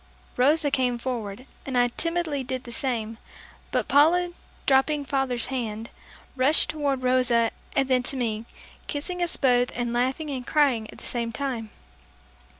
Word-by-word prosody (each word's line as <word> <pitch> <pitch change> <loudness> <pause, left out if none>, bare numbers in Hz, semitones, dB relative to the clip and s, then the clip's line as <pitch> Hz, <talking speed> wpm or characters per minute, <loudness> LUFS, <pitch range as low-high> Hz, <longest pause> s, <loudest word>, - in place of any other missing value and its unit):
Rosa 290 +3 +3
came 250 -3 +1
forward, 235 -2 -4 0.2
and 265 -2 -2
I 245 0 +4
timidly 330 0 -1
did 255 0 -4
the 240 - -9
same; 230 -3 -2 0.5
but - - 0
Paula 345 +5 +4 0.3
dropping 285 +2 +3
father's 265 -4 0
hand, 225 -3 -4 0.4
rushed 270 +4 +4
toward 280 -4 -1
Rosa 250 -2 +3 0.2
and 270 -2 +2
then 255 -1 +3
to 275 - -2
me, 225 -3 -2 0.4
kissing 355 +5 -3
us 345 - 0
both 245 -2 +3
and 240 -1 -2
laughing 260 +5 0
and 255 -2 -5
crying 265 -8 +2
at - - -11
the - - -11
same 235 -1 -2
time. 230 -2 -3
255 Hz, 150 wpm, -26 LUFS, 240-285 Hz, 0.5 s, I